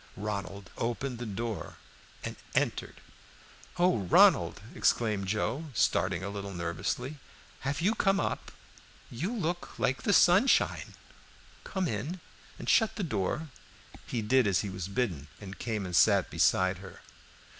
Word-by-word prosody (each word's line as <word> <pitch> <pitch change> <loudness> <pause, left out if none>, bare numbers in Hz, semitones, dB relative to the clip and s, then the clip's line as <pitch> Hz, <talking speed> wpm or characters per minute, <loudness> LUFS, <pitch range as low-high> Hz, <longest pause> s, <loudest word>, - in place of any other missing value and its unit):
Ronald 100 -2 -5
opened 120 +2 -2
the 120 - -4
door 110 +1 -4 0.5
and - - -4 0.2
entered. - - 0 0.8
"Oh, 175 -7 +3
Ronald!" 95 -3 +5
exclaimed 105 -4 +1
Joe, 115 - -1
starting - - +1
a 100 - -3
little 100 -1 -6
nervously, 90 - -3 0.4
"have 140 +4 -2
you 200 +6 +3
come 195 -3 +2
up? - - -3 0.6
You 155 - -3
look 175 -7 -3
like 135 - 0
the - - +1
sunshine. 195 +6 +4 0.7
Come 190 -3 -2
in, 145 - -3 0.4
and - - -8
shut 225 -2 +4
the 210 - -3
door." 150 - -2 0.6
He 115 -3 -2
did 125 +1 +3
as 95 -4 +2
he 100 - -4
was 95 -1 -5
bidden, 100 - -2
and 100 -1 -9
came 110 -4 -2
and 90 -1 -3
sat - - +4
beside 95 -1 +2
her. 95 -1 -11
115 Hz, 140 wpm, -30 LUFS, 100-160 Hz, 0.8 s, Ronald